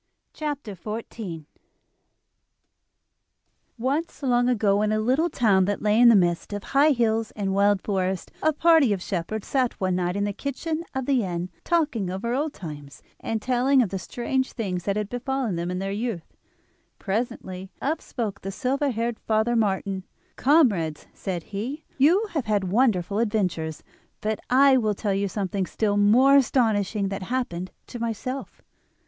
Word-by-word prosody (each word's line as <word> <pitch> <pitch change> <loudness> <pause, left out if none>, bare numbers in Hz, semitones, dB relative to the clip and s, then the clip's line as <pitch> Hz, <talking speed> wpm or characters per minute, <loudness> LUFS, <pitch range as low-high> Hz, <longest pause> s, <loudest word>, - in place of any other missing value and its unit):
] - - -53
The 300 -1 -2
Treasure 215 - -6
Seeker 170 -9 -7 2.3
Once, 285 +7 -2
long 245 -1 +3
ago, 205 -4 +2
in 215 0 +1
a 215 - +1
little 260 +10 +2
town 205 - +3
that 205 +1 -2
lay 210 +1 +3
in 240 0 +8
the 230 - +7
midst 175 0 +1
of 205 -1 -4
high 280 +3 +4
hills 225 -5 +1
and 195 -2 -1
wild 200 0 +3
forests, 190 -2 -2
a 315 - +3
party 310 -6 +4
of 190 - -4
shepherds 195 +3 -3
sat 255 -3 0
one 185 -1 0
night 180 0 -1
in 200 - 0
the 205 0 -1
kitchen 310 - -3
of 265 -1 -1
the 260 -4 +2
inn 180 -1 -3
talking 295 - 0
over 205 +6 -2
old 295 +4 0
times, 145 - -9 0.2
and 220 -1 -3
telling 260 +1 +3
of 210 - -3
the 195 - -3
strange 260 +6 -2
things 185 -6 -3
that 200 - 0
had 210 -1 -1
befallen 245 -2 -2
them 170 +1 -3
in 180 - -2
their 195 +1 -3
youth. 210 -5 -4 0.6
Presently 190 -3 -3
up 310 +4 -1
spoke 220 -5 -4
the 195 - -5
silver 275 +6 0
haired 230 -1 -2
Father 220 +2 +1
Martin. 195 -3 0 0.3
"Comrades," 215 - +2
said 180 -4 -4
he, 245 - -5
"you 345 +11 +5
have 295 -7 -2
had 210 -2 +1
wonderful 200 -1 +1
adventures; 185 -8 -1 0.4
but 215 0 -2
I 270 +1 +6
will 215 -4 +1
tell 200 0 -1
you 200 +1 0
something 195 -1 -2
still 210 -2 0
more 240 +7 +6
astonishing 215 -6 +1
that 195 0 -4
happened 185 -5 -3 0.2
to 240 - -8
myself. 235 +4 -4
215 Hz, 165 wpm, -25 LUFS, 195-255 Hz, 2.3 s, in